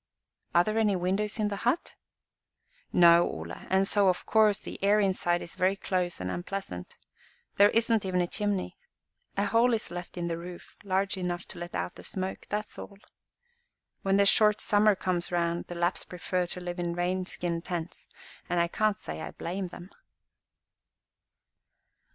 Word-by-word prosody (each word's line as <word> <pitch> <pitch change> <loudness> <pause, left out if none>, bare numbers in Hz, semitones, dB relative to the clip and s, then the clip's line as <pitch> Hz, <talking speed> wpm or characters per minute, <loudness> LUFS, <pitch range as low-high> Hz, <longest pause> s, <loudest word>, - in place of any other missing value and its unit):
"Are 175 - +7
there 215 +3 0
any 210 -3 +3
windows 195 +4 0
in 210 -2 +1
the 200 - -3
hut?" 245 - 0 1.0
"No, 170 -1 +7
Ole, 80 +1 -6 0.2
and 190 +1 +3
so, 200 -2 +4
of 180 - -1
course, 215 -2 +4
the 215 - -9
air 205 +2 +5
inside 185 -3 +1
is 170 - -7
very 185 +2 +2
close 180 -2 -2
and 95 0 -3
unpleasant. 175 - -5 0.6
There 205 +1 +7
isn't 225 -1 +2
even 185 -1 0
a 175 - +3
chimney. 205 +1 -2 0.6
A 200 - +2
hole 230 +3 +4
is 220 - -5
left 175 0 -7
in 170 -1 -2
the 165 -1 -2
roof 175 0 -10
large 195 0 0
enough 180 0 -3
to - - -8
let 175 0 -6
out 90 0 -2
the - - -11
smoke; 190 0 -4
that 210 +1 -1
is - - -8
all. 200 - -9 1.0
When 195 0 +2
the 200 - +5
short 210 +1 +5
summer 210 -1 +4
comes 180 -2 -1
round, 170 -1 0
the 175 - -6
Lapps 175 +2 0
prefer 180 0 -2
to 180 - -5
live 175 0 -5
in 170 -1 -2
deer 180 +1 0
skin 170 -2 -2
tents, 175 -1 -5 0.4
and 175 0 +1
I 170 0 +2
can't 215 +2 +1
say - - -6
I - - -5
blame 185 +2 -4
them." 180 +2 -11
185 Hz, 175 wpm, -29 LUFS, 175-205 Hz, 1.0 s, Are